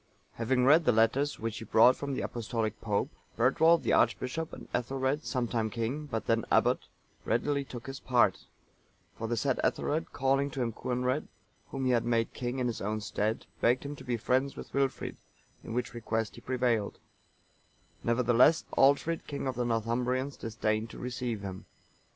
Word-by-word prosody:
Having 125 +2 +1
read 155 +4 +6
the - - +5
letters 120 +6 +2
which 115 0 -4
he - - -7
brought 115 +3 +6
from 140 -1 -4
the - - -2
Apostolic 115 -2 -3
Pope, 105 -3 -1 0.3
Bertwald, 160 +8 +4
the - - +1
archbishop, 155 +6 +1
and - - -10
Ethelred,(928) 135 +4 -1
sometime 120 -3 -1
king, 120 +7 -3
but 110 -6 -3
then 115 -1 +2
abbot, - - +3 0.4
readily 140 +4 0
took 125 -3 -9
his 135 0 -6
part; 120 -7 +2 0.7
for 115 - -4
the 120 +1 -1
said 135 0 0
Ethelred, 155 +2 0
calling 135 +1 +1
to 135 - -6
him 115 -2 -2
Coenred,(929) 125 +4 -1 0.4
whom 135 -1 -3
he 130 - +3
had 120 -2 +3
made 115 -1 0
king 125 +1 -3
in 130 - 0
his 120 -2 -2
own 110 +2 -1
stead, 110 +1 -2 0.2
begged 125 +4 +3
him 145 +1 -5
to - - -12
be 120 -1 -1
friends 130 +4 0
with - - -9
Wilfrid, 135 -1 -1 0.5
in - - -8
which 125 -1 -2
request 115 -2 -2
he - - -12
prevailed; 120 -5 0 1.1
nevertheless 120 +6 +4
Aldfrid, 145 +4 +3
king 140 -1 -4
of 130 - -1
the 125 0 -2
Northumbrians, 125 +4 0
disdained 110 0 -2
to - - -10
receive 125 -3 -3
him. 95 -2 -7
125 Hz, 175 wpm, -30 LUFS, 115-135 Hz, 1.1 s, read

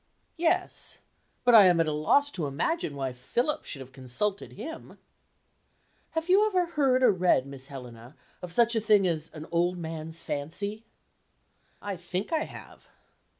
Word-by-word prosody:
"Yes. 350 +2 0 0.5
But 245 -1 +5
I 215 -4 +10
am 175 -2 +4
at 165 - +4
a 155 - -1
loss 220 - +2
to 165 - -2
imagine 145 - -1
why 135 -2 -3
Philip 240 - -1
should 135 - -5
have 130 0 -11
consulted 135 +11 -3
him." 320 +10 -8 1.2
"Have 320 +1 -1
you 385 +3 +5
ever 365 -4 +2
heard 275 -6 +2
or - - +7
read, 180 -8 +2
Miss 140 -1 -6
Helena, 125 -1 -10 0.3
of 180 - -7
such 235 +5 +3
a 225 - +2
thing 210 -2 +4
as 165 -3 -1
'an 155 0 -7
old 175 +1 +1
man's 160 -1 -5
fancy'?" 200 +10 -4 1.0
"I 200 -2 -4
think 180 - -4
I 315 - +1
have." - - -13
180 Hz, 160 wpm, -28 LUFS, 150-245 Hz, 1.2 s, I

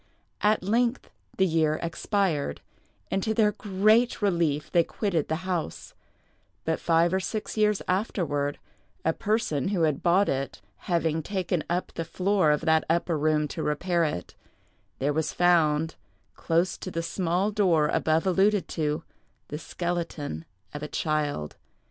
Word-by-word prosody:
At 210 -2 +3
length 235 +5 0 0.3
the 190 - +4
year 160 -3 +1
expired; 170 - -1 0.5
and 195 - +1
to 220 +2 -1
their 210 -1 +4
great 215 +4 +2
relief 170 -8 0
they 170 -2 +4
quitted 175 -5 -1
the 160 +4 -3
house; 175 - -3 0.7
but 160 0 0
five 165 +1 +3
or 190 - +2
six 215 +3 -4
years 210 -2 +2
afterward, 165 -7 -1 0.5
a 160 - +3
person 210 - 0
who 190 -4 +1
had 150 -3 +1
bought 185 +3 +4
it 135 0 -2 0.3
having 165 -2 +1
taken 180 -2 -2
up 175 +2 -2
the 165 - -3
floor 185 -1 +1
of 150 - +2
that 160 -1 +3
upper 170 0 +1
room 150 0 +1
to - - -4
repair 170 +3 0
it, 150 - -3 0.6
there 145 +2 0
was 160 +1 -1
found, 160 -3 +3 0.4
close 170 +2 0
to - - -5
the 165 -2 -3
small 180 +3 0
door 175 -7 +3
above 160 +2 +1
alluded 195 +2 +3
to, 155 0 -1 0.5
the 150 - -4
skeleton 165 - -4 0.3
of 145 - -6
a 150 - -4
child. 150 - -2
170 Hz, 150 wpm, -27 LUFS, 155-195 Hz, 0.7 s, the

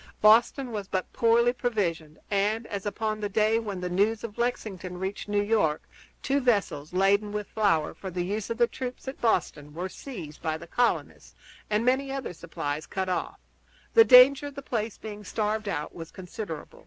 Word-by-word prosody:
Boston 235 +4 +4
was 205 -3 -4
but 185 -1 -3
poorly 235 +1 +4
provisioned, 175 -11 -2
and, 210 +3 +1
as 200 -2 -5
upon 215 +1 -2
the 205 -1 -2
day 215 +2 +2
when 205 -4 -5
the 180 - -2
news 205 +5 +1
of 225 -2 -7
Lexington 195 -7 -3
reached 190 +3 -4
New 205 0 +2
York 205 -8 +1 0.4
two 275 +1 +2
vessels 200 - 0
laden 200 +3 +2
with 210 0 -3
flour 185 -8 +1
for 190 - -7
the 180 0 -2
use 205 +2 -3
of 230 - -2
the 240 - +5
troops 255 +2 -7
at 265 - -6
Boston 150 -9 0
were 180 +3 -3
seized 180 - -9
by 160 -1 -1
the 165 - -10
colonists 240 +8 -1 0.3
and 210 +2 +1
many 265 +2 +2
other 270 -8 -4
supplies 155 -3 -5
cut 190 -1 -2
off, 180 - -2 0.6
the 455 - +9
danger 270 - +8
of 285 - -10
the 280 - -7
place 225 -4 -3
being 210 -1 -8
starved 215 +1 -2
out 150 -6 -3
was 165 -1 -8
considerable. 180 -3 -8
210 Hz, 185 wpm, -27 LUFS, 180-230 Hz, 0.6 s, the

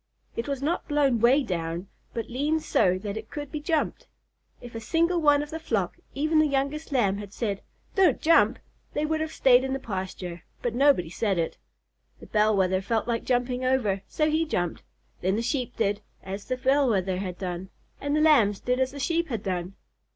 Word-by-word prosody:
It 230 - -3
was 275 -1 -3
not 335 +5 -1
blown 285 -5 +2
'way 255 +6 +5
down, 170 -3 -3 0.2
but 230 - -4
leaned 295 +6 0
so 185 0 +3
that 205 0 -3
it 220 0 -7
could 290 -2 -6
be 305 - -3
jumped. 310 0 -1 0.5
If 240 -1 -11
a 225 - -4
single 335 +8 +1
one 290 -1 +5
of 295 - -9
the 320 - -4
flock, - - -1 0.2
even 310 +3 +2
the 310 - +5
youngest 280 +3 -1
Lamb, 205 -7 +2
had 205 -2 -8
said, 205 -3 -2 0.3
"Don't 365 -9 +4
jump!" 330 +1 +4 0.4
they 295 - 0
would 315 0 0
have 315 0 -2
stayed 255 -3 +5
in 265 0 -2
the 270 - -2
pasture; 185 -5 -5 0.2
but 240 - 0
nobody 255 - +3
said 200 -1 0
it. 165 -1 -2 0.6
The - - -12
Bell 215 -1 +2
Wether 185 0 +2
felt 225 +3 -1
like 235 -1 -1
jumping 250 0 0
over, 240 -7 +1
so 305 - +1
he 310 +1 +2
jumped. 175 - -2 0.4
Then 185 +2 +1
the 225 - -1
Sheep 250 -1 -2
did 205 -2 0 0.2
as 195 +1 -6
the 255 - -2
Bell 270 +1 +3
Wether 190 -3 +1
had 185 -2 -4
done, 185 0 -5 0.3
and 285 +1 -1
the 305 - +3
Lambs 235 -11 +5
did 250 +1 0
as 260 -1 +2
the 280 - -9
Sheep 335 +4 0
had 230 -8 -4
done. 185 0 -3
245 Hz, 205 wpm, -26 LUFS, 195-290 Hz, 0.6 s, way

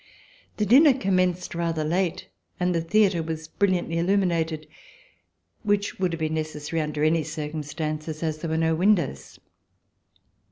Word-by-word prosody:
The 210 - +1
dinner 275 - +7
commenced 185 -5 0
rather 165 -2 -1
late 180 +3 -1 0.3
and 180 0 +1
the 165 - +1
theatre 190 0 +2
was 160 -1 -5
brilliantly 180 -3 0
illuminated, 170 -4 0 0.9
which 205 -2 0
would 185 -2 +1
have 165 - -4
been 155 0 -1
necessary 155 0 -3
under 150 -1 -2
any 160 +1 +3
circumstances, 155 0 -4
as 155 -1 -2
there 165 - -4
were 160 - 0
no 160 0 +2
windows. 170 - +1
165 Hz, 135 wpm, -25 LUFS, 155-185 Hz, 0.9 s, dinner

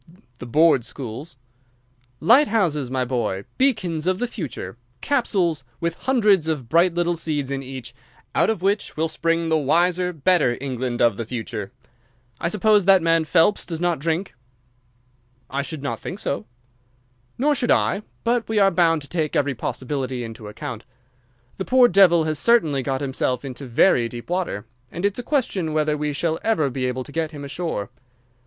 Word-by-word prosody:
"The 125 - -7
board 155 0 +4
schools." 135 +4 -7 0.8
"Light 270 +7 +6
houses, 160 - 0
my 130 -1 -1
boy! 120 -6 -2 0.2
Beacons 185 - +1
of 185 0 +2
the 245 - -1
future! 160 - -6 0.2
Capsules 185 - 0 0.2
with 170 0 -1
hundreds 210 - +2
of 150 -7 -2
bright 170 +3 +3
little 175 0 +1
seeds 150 -4 -2
in 135 0 -2
each, 130 -2 -8 0.4
out - - +3
of 220 -5 -2
which 200 -2 0
will 160 +1 +1
spring 165 +1 -1
the 160 -1 +3
wise, 170 +5 +2 0.2
better 170 -10 +3
England 130 -3 -2
of 115 -4 +3
the 115 - -2
future. 115 -1 -5 0.7
I - - -1
suppose 210 +1 +3
that 190 -3 +5
man 165 -1 +3
Phelps 165 +5 +3
does 165 -2 -5
not 175 -3 0
drink?" 165 +5 -2 1.2
"I 140 +1 -1
should 145 0 -6
not 140 - -3
think 185 - -6
so." 140 - -3 0.9
"Nor 295 +4 +2
should 245 -3 -1
I, 200 - +2 0.2
but 235 -1 0
we 220 - 0
are 195 -1 +5
bound 165 -4 +2
to - - -11
take 155 -2 -2
every 140 -1 +1
possibility 130 0 -3
into 115 -2 -8
account. 120 +1 -7 0.8
The 190 - -2
poor 255 -1 +6
devil 180 -5 +5
has 155 -1 -1
certainly 160 - +3
got 135 0 -2
himself 130 -1 -1
into 135 0 -7
very 120 -1 +3
deep 120 +7 -8
water, 175 - -2 0.3
and 175 +4 -3
it's 205 +3 0
a - - -1
question 230 - -1
whether 155 -1 +1
we 150 0 -2
shall 160 +3 -1
ever 160 -12 +1
be 130 0 -2
able 130 +1 -3
to 145 - -11
get 160 +1 -1
him 145 -2 -8
ashore. 140 - -4
160 Hz, 175 wpm, -22 LUFS, 135-185 Hz, 1.2 s, Light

